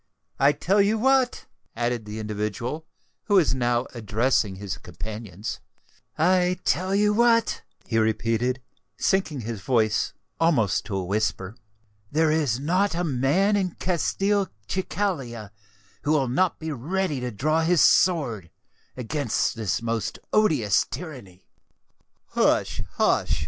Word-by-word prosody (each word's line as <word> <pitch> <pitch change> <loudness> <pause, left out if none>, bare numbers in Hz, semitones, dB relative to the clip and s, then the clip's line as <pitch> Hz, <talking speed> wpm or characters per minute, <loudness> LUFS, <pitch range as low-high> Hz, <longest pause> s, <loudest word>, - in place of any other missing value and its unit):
I 140 +2 +6
tell 195 +7 +2
you 210 +3 +2
what," 260 +1 +2 0.3
added 120 -1 -1
the 105 +1 -7
individual 110 +8 -4 0.4
who 205 - +2
was 180 -8 +4
now 120 -1 +1
addressing 110 -2 0
his 95 -6 -5
companions,—"I 115 - -3
tell 185 +2 +1
you 210 +1 +3
what," 230 0 +3 0.2
he 115 -2 0
repeated, 115 +3 0 0.3
sinking 175 -8 0
his 110 -2 -5
voice 110 -4 +1 0.3
almost 140 - +2
to 100 - -4
a 95 - -2
whisper, 100 0 -1 0.6
"there 160 +1 +3
is 145 -7 +1
not 180 +6 +1
a 175 - 0
man 160 +8 +2
in 190 -3 -1
Castelcicala 180 - -2 0.5
who 145 - 0
will 140 -4 +2
not 170 +9 +1
be 160 0 -5
ready 155 +3 -2
to 125 0 -3
draw 155 +9 0
his 165 0 +4
sword 130 - +3 0.5
against 125 -1 -1
this 110 -1 -2
most 115 -1 -2 0.2
odious 150 - +3
tyranny." 125 - -9 0.8
"Hush! - - +1
hush!" - - +1
135 Hz, 125 wpm, -25 LUFS, 110-180 Hz, 0.8 s, I